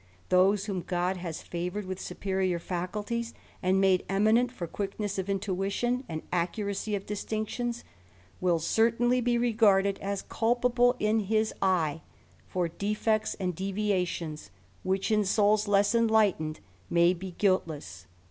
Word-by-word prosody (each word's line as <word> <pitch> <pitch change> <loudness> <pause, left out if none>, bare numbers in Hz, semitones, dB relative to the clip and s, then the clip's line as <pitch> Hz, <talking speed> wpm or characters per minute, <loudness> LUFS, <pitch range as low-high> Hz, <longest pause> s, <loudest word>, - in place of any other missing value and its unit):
Those, 190 +2 +4
whom 195 -4 -2
God 180 +1 -1
has 170 -3 -6
favoured 180 +4 -4
with 185 0 -5
superior 190 -1 -1
faculties 205 +7 -4 0.3
and 185 +1 +2
made 190 -2 +3
eminent 220 +5 +3
for 180 -8 -5
quickness 200 +3 -4
of 190 +1 -3
intuition, 200 +6 -1
and 160 -1 -4
accuracy 200 +4 -1
of 195 - -5
distinctions, 220 +3 -3 0.6
will 180 -2 +2
certainly 235 +8 +2
be 240 0 +2
regarded 210 -5 +3
as 200 0 -3
culpable 245 +1 +2
in 215 -1 +1
bis 220 +1 +1
eye, 165 -5 +1 0.5
for 180 -2 -1
defects 215 +4 -1
and 180 -3 -3
devialions 185 - -2 0.3
which, 190 +3 -1
in 210 -1 +3
souls 210 +1 +3
less 200 +1 +3
enlightened, 215 -9 +2 0.3
may 170 +1 +4
be 185 0 -8
guiltless. 150 - -1
195 Hz, 130 wpm, -28 LUFS, 180-220 Hz, 0.6 s, Those